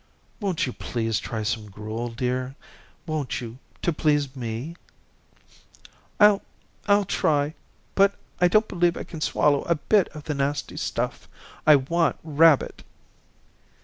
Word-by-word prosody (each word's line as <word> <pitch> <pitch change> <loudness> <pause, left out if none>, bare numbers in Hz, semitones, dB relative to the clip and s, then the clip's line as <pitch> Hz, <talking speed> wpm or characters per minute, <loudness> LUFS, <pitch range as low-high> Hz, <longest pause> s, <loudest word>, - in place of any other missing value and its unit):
"Won't 190 -6 0
you 125 - -5
please 115 -2 -2
try 110 -2 -4
some 110 -1 -2
gruel, 110 +4 -5
dear? 125 +2 -2 0.5
Won't 155 -5 -2
you, 120 +1 -8 0.2
to 170 - +1
please 145 -3 +1
me?" 120 +6 -5 1.4
"I'll 210 -1 +6 0.5
I'll 205 0 +4
try, 150 -5 +1 0.4
but 200 0 +4 0.2
I 180 - +5
don't 215 +5 +3
believe 175 -1 +1
I - - -4
can 160 -3 -9
swallow 145 -2 +2
a 170 - +2
bit 200 +5 +2
of 150 -2 -10
the 150 - -3
nasty 140 +1 -2
stuff. - - -3 0.4
I 155 - +9
want 165 +5 +1
rabbit." 155 -1 +3
145 Hz, 135 wpm, -25 LUFS, 125-170 Hz, 1.4 s, I